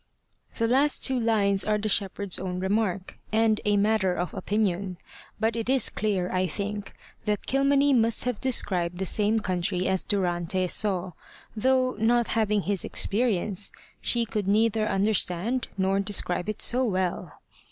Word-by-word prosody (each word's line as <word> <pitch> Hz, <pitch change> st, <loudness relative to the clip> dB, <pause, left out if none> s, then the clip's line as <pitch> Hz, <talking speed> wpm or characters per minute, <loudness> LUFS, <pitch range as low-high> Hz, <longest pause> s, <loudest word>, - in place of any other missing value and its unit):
The 230 Hz, -, +1 dB
last 270 Hz, +5 st, +3 dB
two 260 Hz, -2 st, +1 dB
lines 200 Hz, -4 st, +2 dB
are 215 Hz, 0 st, +1 dB
the 215 Hz, +1 st, -2 dB
shepherd's 200 Hz, -2 st, 0 dB
own 180 Hz, -1 st, -4 dB
remark, 190 Hz, -1 st, -2 dB
and 220 Hz, 0 st, +2 dB
a 205 Hz, -1 st, +3 dB
matter 200 Hz, -3 st, +2 dB
of 175 Hz, 0 st, -3 dB
opinion. 195 Hz, -3 st, -1 dB, 0.4 s
But 225 Hz, +1 st, 0 dB
it 230 Hz, +1 st, -3 dB
is 265 Hz, -3 st, +2 dB
clear, 195 Hz, -4 st, -1 dB
I 185 Hz, 0 st, 0 dB
think, 205 Hz, +1 st, -5 dB, 0.3 s
that 210 Hz, -1 st, -1 dB
Kilmeny 275 Hz, +1 st, +3 dB
must 230 Hz, -2 st, +2 dB
have 250 Hz, -3 st, -3 dB
described 180 Hz, -9 st, 0 dB
the 190 Hz, -, -2 dB
same 210 Hz, +3 st, +1 dB
country 185 Hz, -2 st, -1 dB
as 190 Hz, -1 st, +1 dB
Durante 185 Hz, -2 st, -1 dB
saw, 185 Hz, -3 st, 0 dB, 0.4 s
though, 255 Hz, +3 st, +2 dB
not 235 Hz, +1 st, +2 dB
having 210 Hz, -3 st, +1 dB
his 200 Hz, -2 st, 0 dB
experience, 205 Hz, -3 st, 0 dB, 0.3 s
she 235 Hz, -1 st, +2 dB
could 210 Hz, -3 st, -3 dB
neither 215 Hz, +1 st, +2 dB
understand 205 Hz, +3 st, 0 dB
nor 190 Hz, +1 st, +1 dB
describe 195 Hz, -2 st, -1 dB
it 215 Hz, -, 0 dB
so 250 Hz, +2 st, +3 dB
well. 185 Hz, -6 st, -2 dB
205 Hz, 150 wpm, -26 LUFS, 190-225 Hz, 0.4 s, last